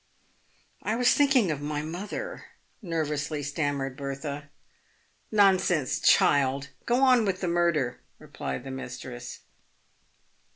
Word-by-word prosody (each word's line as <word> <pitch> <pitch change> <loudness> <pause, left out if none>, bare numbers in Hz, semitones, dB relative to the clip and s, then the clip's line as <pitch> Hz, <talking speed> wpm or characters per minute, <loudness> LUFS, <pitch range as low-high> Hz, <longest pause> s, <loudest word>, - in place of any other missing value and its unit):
" - - -38 0.3
I 215 - -1
was 245 +1 +4
thinking 275 - +3
of 145 -2 -3
my 150 0 -3
mother," 195 - -6 0.4
nervously 155 -4 -2
stammered 145 -2 -2
Bertha. 140 +1 -5 0.4
" - - -39
Nonsense, 180 -7 +3
child! 140 0 +3 0.2
go 245 +3 +3
on 255 -3 +6
with 190 -3 -1
the 180 - -2
murder," 170 -8 +1 0.2
replied 65 - -6
the 135 - -7
mis 130 -1 -6
tress. 125 -1 -8
150 Hz, 125 wpm, -27 LUFS, 140-190 Hz, 0.4 s, on